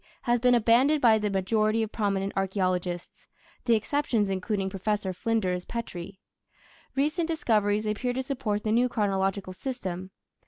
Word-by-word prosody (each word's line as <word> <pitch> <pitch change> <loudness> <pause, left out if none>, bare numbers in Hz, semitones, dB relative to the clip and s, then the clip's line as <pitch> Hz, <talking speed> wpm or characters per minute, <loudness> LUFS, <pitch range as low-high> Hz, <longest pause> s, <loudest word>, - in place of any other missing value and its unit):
has 240 -1 +2
been 250 +1 +4
abandoned 240 +6 +4
by 225 -4 +5
the 210 0 -1
majority 215 +3 +1
of 220 - -4
prominent 200 -2 -1
archaeologists, 185 -2 -2 0.4
the 235 - +5
exceptions 225 -3 0
including 195 +1 -1
Professor 195 0 -2
Flinders 185 -3 -1
Petrie. 195 -5 -6 0.8
Recent 305 +5 +1
discoveries 215 -10 +1
appear 215 +4 -1
to 260 +1 -2
support 245 -6 -2
the 215 - 0
new 245 +3 +3
chronological 195 -3 -1
system. 185 -5 -5
215 Hz, 135 wpm, -27 LUFS, 195-240 Hz, 0.8 s, by